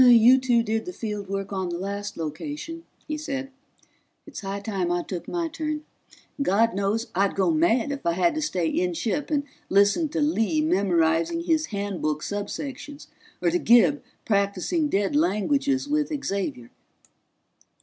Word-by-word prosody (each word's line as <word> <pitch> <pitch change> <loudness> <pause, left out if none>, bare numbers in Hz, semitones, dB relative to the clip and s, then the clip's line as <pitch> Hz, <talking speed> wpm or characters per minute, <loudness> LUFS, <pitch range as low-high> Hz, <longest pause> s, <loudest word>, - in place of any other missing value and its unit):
"You 245 +1 +8
two 245 -3 +2
did 220 0 -1
the 360 - -6
field 210 - -5
work 195 0 -3
on 190 -2 -2
the 170 - -3
last 200 +2 -4
location," 295 - -5 0.2
he 305 -1 -2
said. 275 -2 -4 0.7
"It's 300 - -8
high 195 0 -4
time 195 -4 -2
I 175 0 0
took 180 -3 -6
my 345 -1 -1
turn 305 -1 -4 0.6
and - - +2
God 225 +5 +3
knows 200 +5 -1
I'd 195 +2 +1
go 190 -3 +2
mad 225 - +2
if 280 - -5
I 170 - +1
had 315 - +2
to 310 - -2
stay 185 - 0
inship 180 - -1
and 295 -2 +1 0.3
listen 200 - +3
to 325 +2 -2
Lee 295 -1 +1
memorizing 185 - +2
his 320 -2 +1
Handbook 195 -7 -2
subsections 275 +8 -5 0.3
or 345 - +3
to 355 - +1
Gib 245 +2 +5 0.2
practicing 200 - +1
dead 200 +6 0
languages 280 - +1
with 300 0 +1 0.2
Xavier." 190 -12 -3
220 Hz, 160 wpm, -25 LUFS, 195-295 Hz, 0.7 s, You